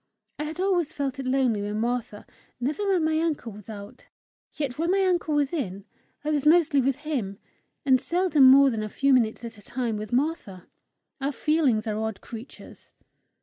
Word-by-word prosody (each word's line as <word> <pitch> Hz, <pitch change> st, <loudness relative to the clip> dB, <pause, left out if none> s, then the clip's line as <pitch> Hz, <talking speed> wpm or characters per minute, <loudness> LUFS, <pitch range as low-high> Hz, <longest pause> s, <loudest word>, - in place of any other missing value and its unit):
I 300 Hz, -, -2 dB
had 315 Hz, +3 st, -6 dB
always 365 Hz, -5 st, +1 dB
felt 275 Hz, -2 st, -3 dB
it 265 Hz, -, -4 dB
lonely 255 Hz, -5 st, +1 dB
when 210 Hz, +1 st, -3 dB
Martha, 235 Hz, -2 st, -3 dB, 0.3 s
never 300 Hz, +11 st, -2 dB
when 375 Hz, -4 st, +2 dB
my 315 Hz, 0 st, +1 dB
uncle 310 Hz, -8 st, -2 dB
was 210 Hz, +1 st, -12 dB
out. 205 Hz, -2 st, -10 dB, 0.5 s
Yet 285 Hz, -3 st, -4 dB
when 335 Hz, +1 st, 0 dB
my 385 Hz, +1 st, +3 dB
uncle 345 Hz, -4 st, +1 dB
was 290 Hz, 0 st, +1 dB
in, 200 Hz, -, -4 dB, 0.4 s
I 305 Hz, -, -1 dB
was 290 Hz, -2 st, 0 dB
mostly 300 Hz, -3 st, +4 dB
with 270 Hz, +2 st, -1 dB
him, 245 Hz, -11 st, -3 dB, 0.5 s
and 260 Hz, -2 st, +4 dB
seldom 345 Hz, -5 st, +3 dB
more 270 Hz, +1 st, +7 dB
than 220 Hz, -2 st, -2 dB
a 215 Hz, -, -4 dB
few 275 Hz, +5 st, +2 dB
minutes 235 Hz, -2 st, +1 dB
at 225 Hz, -2 st, -9 dB
a -, -, -15 dB
time 240 Hz, 0 st, -3 dB
with 210 Hz, 0 st, -6 dB
Martha. 245 Hz, -, -2 dB, 0.6 s
Our 275 Hz, +2 st, 0 dB
feelings 280 Hz, -7 st, +1 dB
are 215 Hz, -1 st, -2 dB
odd 220 Hz, -2 st, -3 dB
creatures! 235 Hz, +3 st, -12 dB
265 Hz, 190 wpm, -26 LUFS, 220-310 Hz, 0.6 s, more